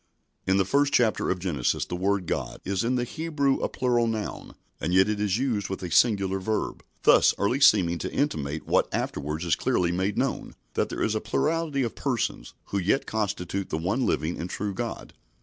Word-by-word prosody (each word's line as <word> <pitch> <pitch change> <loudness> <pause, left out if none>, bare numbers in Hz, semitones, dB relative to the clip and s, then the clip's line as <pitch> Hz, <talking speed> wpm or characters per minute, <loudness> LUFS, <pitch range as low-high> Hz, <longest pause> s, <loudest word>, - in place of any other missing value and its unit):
In 95 +1 +3
the 95 - +3
first 140 +6 +2
chapter 115 -8 +2
of 95 - +1
Genesis 85 -9 -1
the - - -4
word 95 +1 0
"God" - - -3
is 95 +1 -1
in 125 +2 +1
the 125 - 0
Hebrew 145 0 0
a - - -1
plural 120 -2 +1
noun, 105 - -4 0.2
and 90 +3 -1
yet 95 +1 +6
it 105 -1 -1
is 105 -1 +1
used 115 -7 -1
with 95 0 -5
a 90 - -5
singular 100 -5 +3
verb, 105 +2 -2 0.2
thus - - +6
early 110 +7 +1
seeming 90 -10 +5
to - - -4
intimate 80 - -2
what - - +2
afterwards 75 +4 -3
is 85 - +3
clearly 85 -1 +1
made 95 +3 -1
known, - - -2 0.2
that - - 0
there - - -3
is 110 - +1
a 110 - -1
plurality 150 +5 0
of 115 - -2
Persons, 120 - -2
who 100 - 0
yet 100 +9 +1
constitute 100 -3 -2
the 80 - -1
one 95 +11 0
living 80 -5 -1
and 85 - -4
true 100 +1 -3
God. 115 +4 -5
100 Hz, 200 wpm, -26 LUFS, 90-120 Hz, 0.2 s, yet